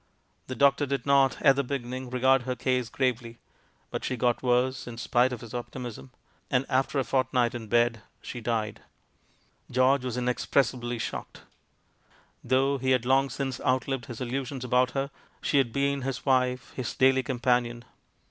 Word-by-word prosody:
The 130 Hz, -, -5 dB
doctor 140 Hz, +2 st, +3 dB
did 135 Hz, -2 st, -2 dB
not, 135 Hz, -3 st, +3 dB
at 135 Hz, -2 st, +6 dB
the 140 Hz, -, 0 dB
beginning, 130 Hz, -1 st, -4 dB
regard 130 Hz, +1 st, +3 dB
her 125 Hz, +1 st, -3 dB
case 125 Hz, -1 st, 0 dB
gravely. 120 Hz, -2 st, -1 dB, 0.5 s
But -, -, -4 dB
she 125 Hz, -, -2 dB
got 120 Hz, 0 st, +1 dB
worse, 125 Hz, +1 st, +1 dB
in 120 Hz, -1 st, -7 dB
spite 125 Hz, +2 st, +2 dB
of 125 Hz, -, -5 dB
his 115 Hz, -1 st, -10 dB
optimism, 120 Hz, -, -6 dB, 0.4 s
and 125 Hz, +2 st, +1 dB
after 135 Hz, +1 st, +1 dB
a 135 Hz, -, +2 dB
fortnight 125 Hz, -2 st, +1 dB
in 115 Hz, -2 st, -6 dB
bed 120 Hz, 0 st, +2 dB, 0.2 s
she 120 Hz, -, -7 dB
died. 110 Hz, -2 st, -2 dB, 0.9 s
George 130 Hz, +1 st, +3 dB
was 125 Hz, -1 st, -3 dB
inexpressibly 125 Hz, 0 st, 0 dB
shocked. 110 Hz, -, -6 dB, 1.0 s
Though 135 Hz, +2 st, +2 dB
he 130 Hz, +1 st, -1 dB
had 125 Hz, -2 st, +2 dB
long 135 Hz, +2 st, +3 dB
since 135 Hz, -3 st, -4 dB
outlived 130 Hz, -1 st, 0 dB
his 120 Hz, -3 st, -7 dB
illusions 130 Hz, +1 st, -3 dB
about 125 Hz, +1 st, +3 dB
her, 135 Hz, +1 st, -1 dB, 0.3 s
she 140 Hz, -, +2 dB
had 125 Hz, -4 st, +1 dB
been 140 Hz, +2 st, 0 dB
his 130 Hz, -1 st, -4 dB
wife, 125 Hz, -2 st, +1 dB
his 125 Hz, -3 st, -4 dB
daily 130 Hz, +1 st, +4 dB
companion. 120 Hz, -2 st, 0 dB
125 Hz, 165 wpm, -27 LUFS, 120-135 Hz, 1.0 s, at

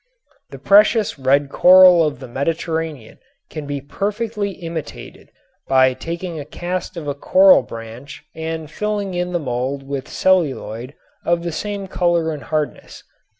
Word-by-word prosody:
The -, -, -10 dB
precious 210 Hz, -, +3 dB
red 140 Hz, +2 st, +2 dB
coral 180 Hz, -2 st, +7 dB
of 150 Hz, -5 st, -2 dB
the 130 Hz, -, -9 dB
Mediterranean 160 Hz, -1 st, -3 dB, 0.3 s
can 155 Hz, -2 st, -6 dB
be 145 Hz, -1 st, -3 dB
perfectly 205 Hz, -, -3 dB
imitated 165 Hz, -4 st, -8 dB, 0.4 s
by 130 Hz, -1 st, +4 dB
taking 170 Hz, +3 st, -6 dB
a -, -, -5 dB
cast 175 Hz, +4 st, -5 dB
of 155 Hz, -3 st, -6 dB
a 145 Hz, -, -1 dB
coral 280 Hz, -, +5 dB
branch 115 Hz, +4 st, -10 dB
and 160 Hz, -1 st, -5 dB
filling 205 Hz, 0 st, -3 dB
in 180 Hz, 0 st, -2 dB
the 175 Hz, -, 0 dB
mold 130 Hz, 0 st, -3 dB
with 140 Hz, -1 st, -4 dB
celluloid 140 Hz, -8 st, 0 dB, 0.3 s
of 170 Hz, 0 st, 0 dB
the 170 Hz, -, -3 dB
same 200 Hz, +3 st, -4 dB
color 175 Hz, -3 st, 0 dB
and 150 Hz, -2 st, -6 dB
hardness. 150 Hz, +3 st, -4 dB
160 Hz, 145 wpm, -19 LUFS, 140-185 Hz, 0.4 s, coral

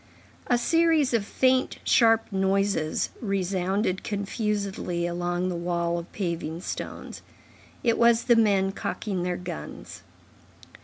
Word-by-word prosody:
A 245 Hz, -, +3 dB
series 320 Hz, 0 st, +3 dB
of 230 Hz, -3 st, +2 dB
faint, 260 Hz, 0 st, +2 dB
sharp 225 Hz, -2 st, +4 dB
noises 195 Hz, -4 st, 0 dB
resounded 190 Hz, -1 st, -1 dB
confusedly 200 Hz, -4 st, -2 dB
along 175 Hz, +1 st, -1 dB
the 180 Hz, -, -3 dB
wall 170 Hz, 0 st, -1 dB
of 170 Hz, -, -10 dB
paving 170 Hz, -3 st, -3 dB
stones. -, -, -6 dB, 0.6 s
It 230 Hz, -2 st, +2 dB
was 235 Hz, 0 st, +5 dB
the 240 Hz, -, +4 dB
men 200 Hz, -4 st, +3 dB
cocking 195 Hz, -1 st, -3 dB
their 180 Hz, 0 st, -1 dB
guns. 75 Hz, -, -8 dB
195 Hz, 115 wpm, -26 LUFS, 175-225 Hz, 0.6 s, was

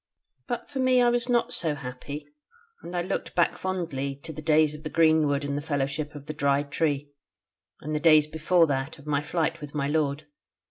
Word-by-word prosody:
"But 240 Hz, -2 st, -3 dB
for 275 Hz, -, -5 dB
me 255 Hz, -1 st, +4 dB
I 245 Hz, -1 st, +5 dB
was 240 Hz, +1 st, -1 dB
not 240 Hz, -1 st, +2 dB
so 160 Hz, -3 st, +1 dB
happy: 135 Hz, +2 st, -7 dB, 0.6 s
and 175 Hz, +1 st, -7 dB
I 175 Hz, -, 0 dB
looked 185 Hz, -, -4 dB
back 175 Hz, -, +3 dB
fondly 160 Hz, -8 st, -3 dB
to 160 Hz, -, -7 dB
the 155 Hz, -, -7 dB
days 155 Hz, -1 st, +3 dB
of 150 Hz, -, -9 dB
the 155 Hz, -, -5 dB
greenwood 155 Hz, -3 st, +3 dB
and 140 Hz, 0 st, -2 dB
the 145 Hz, -, -2 dB
fellowship 145 Hz, 0 st, -2 dB
of 145 Hz, -1 st, -9 dB
the 155 Hz, -, -5 dB
Dry 140 Hz, -2 st, +2 dB
Tree, 145 Hz, 0 st, -1 dB, 0.7 s
and 155 Hz, +2 st, -4 dB
the 150 Hz, -, 0 dB
days 155 Hz, -2 st, +6 dB
before 160 Hz, +3 st, +3 dB
that, 135 Hz, +1 st, -2 dB
of 145 Hz, -, -15 dB
my 145 Hz, -1 st, 0 dB
flight 165 Hz, +1 st, -1 dB
with 150 Hz, 0 st, -8 dB
my 140 Hz, -2 st, 0 dB
lord. 145 Hz, -1 st, 0 dB
155 Hz, 205 wpm, -27 LUFS, 145-165 Hz, 0.7 s, days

